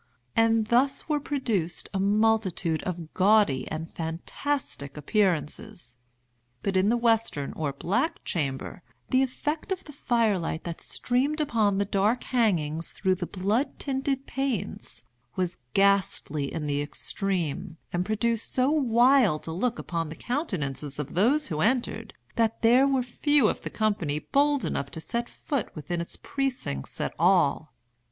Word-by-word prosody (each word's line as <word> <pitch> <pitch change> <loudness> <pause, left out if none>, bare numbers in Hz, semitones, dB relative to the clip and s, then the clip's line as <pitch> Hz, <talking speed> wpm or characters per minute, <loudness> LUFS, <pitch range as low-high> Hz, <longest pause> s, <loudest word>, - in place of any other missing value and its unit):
And 225 -1 +4
thus 250 +5 +2
were 300 -2 +1
produced 230 - -1
a 195 - 0
multitude 200 -5 +2
of 170 -3 -5
gaudy 190 -10 +4
and 160 +1 -4
fantastic 165 - -4
appearances. 170 - -1 0.6
But 195 -1 -1
in 190 +2 +4
the 240 - +3
western 225 -11 +1
or 150 -3 -2
black 235 - -1
chamber 140 0 -3 0.3
the 255 - +4
effect 295 +6 -2
of 380 - -2
the 295 - -11
fire 230 -7 +1
light 160 -1 -3
that 170 -1 -6
streamed 270 +5 0
upon 220 -9 +2
the 200 - +1
dark 205 +5 +1
hangings 170 - 0
through 190 -2 +1
the 180 -1 -3
blood 205 +8 0
tinted 270 0 -1
panes, 220 - -3 0.3
was 180 -1 -1 0.2
ghastly 195 -7 +2
in 155 -2 -3
the 145 0 0
extreme, 175 +2 -3 0.2
and 175 0 +1
produced 220 +3 -1
so 260 +2 +2
wild 245 - +4
a - - -3
look 235 +8 -1
upon 165 -2 -3
the 155 - -7
countenances 150 - -3
of 150 -1 -5
those 255 - +3
who 155 -2 -2
entered, 225 -1 0 0.2
that 225 0 +1
there 250 +4 +6
were 265 -2 +2
few 280 +1 +3
of - - -3
the - - -5
company 200 -9 0
bold 285 - +2
enough 140 - -2
to - - -6
set 235 +8 -3
foot 280 -6 -3
within 170 +2 -3
its 170 - -2
precincts 260 - -3
at - - -2
all. 170 -4 +3
205 Hz, 150 wpm, -27 LUFS, 165-245 Hz, 0.6 s, there